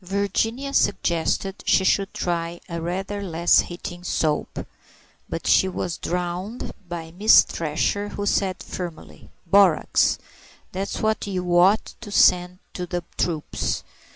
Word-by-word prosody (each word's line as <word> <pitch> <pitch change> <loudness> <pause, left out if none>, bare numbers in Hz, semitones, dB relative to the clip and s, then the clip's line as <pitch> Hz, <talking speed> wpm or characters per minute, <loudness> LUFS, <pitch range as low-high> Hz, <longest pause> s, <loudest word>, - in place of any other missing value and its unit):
Virginia 210 +8 -1
suggested 190 -2 +1
she 190 - +4
should 195 +1 +2
try 170 -1 -3
a 170 -2 -5
rather 190 +4 -3
less 170 -2 +3
heating 175 0 -5
soap; 155 -4 -1 0.6
but - - -5
she 190 - +4
was 180 -2 -4
drowned 180 +6 -3 0.2
by 165 -2 -6
Miss 205 +6 +6
Thresher, 170 +6 -2
who 205 - -4
said 190 -2 0
firmly, 175 -3 -8 0.2
"Borax; 190 -2 +4 0.5
that's 195 +2 -4
what 220 -1 0
you 180 -3 -1
ought 190 +5 +4
to 215 - -8
send 180 -2 +4 0.2
to 180 -1 -5
the 175 -1 -3
troops. 160 -4 -2
180 Hz, 125 wpm, -23 LUFS, 175-200 Hz, 0.6 s, Miss